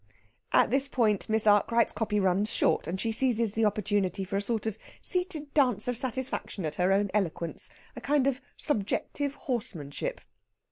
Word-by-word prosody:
At - - +4
this 270 +1 +2
point 220 -7 +1
Miss 220 0 +1
Arkwright's 215 +3 +4
copy 210 -1 0
runs 195 +2 +2
short, - - +1
and 185 +3 -3
she 225 +3 -1
seizes 230 -2 +2
the 225 0 +2
opportunity 205 -2 0
for 190 +1 -4
a 200 - +1
sort 225 +1 -2
of 220 -3 -2 0.3
seated 360 -6 -1
dance 250 -8 +2
of 245 - 0
satisfaction 255 - -3
at 155 - -2
her 180 +2 +3
own 200 0 +2
eloquence 170 -5 -1 0.3
a - - -7
kind 285 -1 +2
of 275 -1 0 0.2
subjective 280 +3 -1
horsemanship. 210 - -3
220 Hz, 170 wpm, -29 LUFS, 200-255 Hz, 0.3 s, At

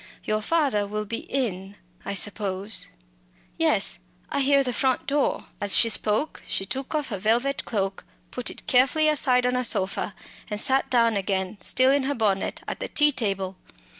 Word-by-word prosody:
"Your 215 0 -1
father 265 -7 +1
will 210 +1 -4
be 230 +2 -4
in, 200 -7 -2 0.3
I - - -3
suppose. 200 0 -1 0.7
Yes, - - +2 0.3
I - - 0
hear 275 0 +4
the 250 -2 -2
front 260 0 0
door." 280 0 0 0.2
As 205 -1 +4
she 230 - +4
spoke 220 +7 +2
she 195 - -1
took 265 +8 -5
off 300 -3 -2
her 200 -4 -4
velvet 240 +7 +1
cloak, 195 -3 -2 0.3
put 250 - -2
it - - -9
carefully 270 +5 +3
aside 255 -5 +3
on 250 0 +1
a 250 - 0
sofa, 195 -3 -1 0.3
and 210 -1 -2
sat 265 +4 +2
down 230 -3 +3
again, 195 0 -2
still 260 +1 +4
in 280 -1 +1
her 285 +1 -1
bonnet, 205 -4 -1
at - - -5
the - - -4
tea 295 0 +3
table. 195 -7 -2
230 Hz, 175 wpm, -25 LUFS, 200-265 Hz, 0.7 s, hear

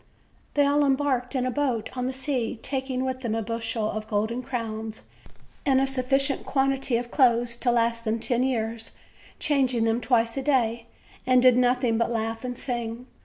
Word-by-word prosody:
They 290 -1 +4
all 290 +1 +3
embarked 270 -2 +1
in 255 -1 +1
a 255 - 0
boat 250 -5 -1
on 250 0 -1
the - - -1
sea, 265 -3 -2
taking 260 -1 -2
with 260 0 -2
them 235 -4 -2
the 225 0 -1
bushel 225 0 -2
of 215 0 -5
golden 220 +4 -1
crowns 225 -3 -5 0.6
and 270 -2 +3
a 270 - +3
sufficient 270 +1 +1
quan 270 0 +1
tity 270 -3 0
of 240 0 -7
clothes 240 -3 +3
to 245 - 0
last 230 -1 +1
them 220 0 0
ten 240 +1 0
years, 230 -3 -2 0.4
changing 260 -5 +1
them 225 +1 +1
twice 230 -3 +2
a - - 0
day; 235 -5 +1 0.4
they 255 0 +5
did 250 -1 +6
nothing 245 -2 +2
but 230 - +1
laugh 225 0 -2
and 245 -1 -4
sing. 240 -2 -4
245 Hz, 185 wpm, -26 LUFS, 230-265 Hz, 0.6 s, did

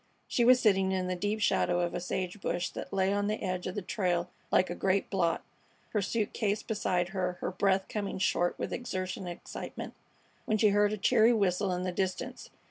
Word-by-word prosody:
She 240 - +1
was 250 +1 +7
sitting 195 -4 +3
in 185 -1 0
the 185 0 -1
deep 205 +4 -1
shadow 175 -4 +2
of 175 -1 -1
a - - -2
sage 185 +2 -3
bush 175 -1 -1
that - - -7
lay 195 0 +2
on 205 0 0
the 215 +1 -2
edge 185 -2 -2
of 185 - -4
the 205 - -3
trail 180 -3 -1 0.2
like 185 -2 +3
a - - -1
great 190 +2 0
blot, 180 -4 +1 0.5
her 210 - 0
suit 210 +2 -1
case 210 -2 0
beside 180 -5 0
her, 180 -1 -1
her 180 - -4
breath 190 +1 +1
coming 205 -2 -3
short 175 -2 +1
with - - -3
exertion 185 -5 -4
and 175 - -5
excitement, - - -7 0.5
when 215 - +1
she 215 0 +5
heard 205 0 +3
a 215 - -2
cheery 220 +4 +5
whistle 195 -2 +1
in 180 0 -1
the 185 - -1
distance. 185 +1 -3
190 Hz, 215 wpm, -30 LUFS, 180-205 Hz, 0.5 s, was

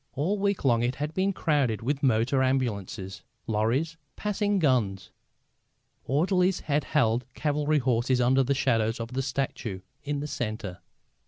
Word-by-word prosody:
All 180 +9 0
week 200 -5 0
long 120 -3 +4
it 120 +2 0
had 150 +2 -3
been 190 +3 +1
crowded 145 - 0
with 140 +3 -1
motor 130 +1 +2
ambulances, 110 -7 -1 0.2
lorries, 120 +10 0 0.2
passing 205 0 0
guns. 115 - +1 0.9
Orderlies 180 - +2
had 145 -1 0
held 120 -5 +2
cavalry 150 0 +1
horses 125 -1 +1
under 130 +2 +4
the 135 +1 +1
shadow 115 -5 +2
of 115 +2 -5
the 135 - 0
statue 130 -7 -3 0.2
in 145 0 -2
the 145 - -3
centre. 110 -8 -4
135 Hz, 145 wpm, -27 LUFS, 115-150 Hz, 0.9 s, long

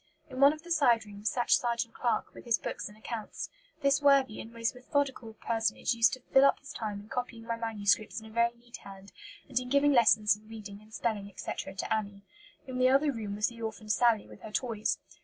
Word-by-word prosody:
In 255 - -6
one 280 +1 +8
of 310 +1 -8
the 345 - -10
side 240 -9 +4
rooms 205 +1 -3
sat 245 -1 -1
Sergeant 235 -1 +2
Clarke, 240 -2 -1
with - - -12
his 235 -2 +3
books - - -5
and 210 - -16
accounts. 220 0 -6 0.3
This 280 +1 +3
worthy 275 -5 +4
and 225 - -10
most 230 +1 -2
methodical 255 -3 -2
personage 225 +1 0
used 230 +2 +4
to 255 - -5
fill 270 0 +7
up 275 - +4
his 285 - -10
time 210 -2 -4
in 205 - -15
copying 245 -2 -5
my 230 0 -2
manuscripts 215 -1 0
in 220 - -13
a 220 - -12
very 235 +1 +2
neat 240 0 -12
hand, 195 0 -12 0.4
and 255 -3 0
in 250 0 -7
giving 280 +2 +4
lessons 215 -4 +5
in 215 +1 -18
reading 210 -2 -9
and 215 +1 -19
spelling, 215 -3 -2
etc., 190 0 -6
to 190 - -2
Annie. 200 -2 -3 0.4
In 255 -1 -5
the 255 0 +5
other 280 +3 +4
room 215 -5 -5
was 210 0 +1
the 230 -1 -12
orphan 220 -1 -6
Sally, 225 -1 +3
with - - -14
her 215 - -9
toys. 220 -2 -1
230 Hz, 225 wpm, -30 LUFS, 215-255 Hz, 0.4 s, one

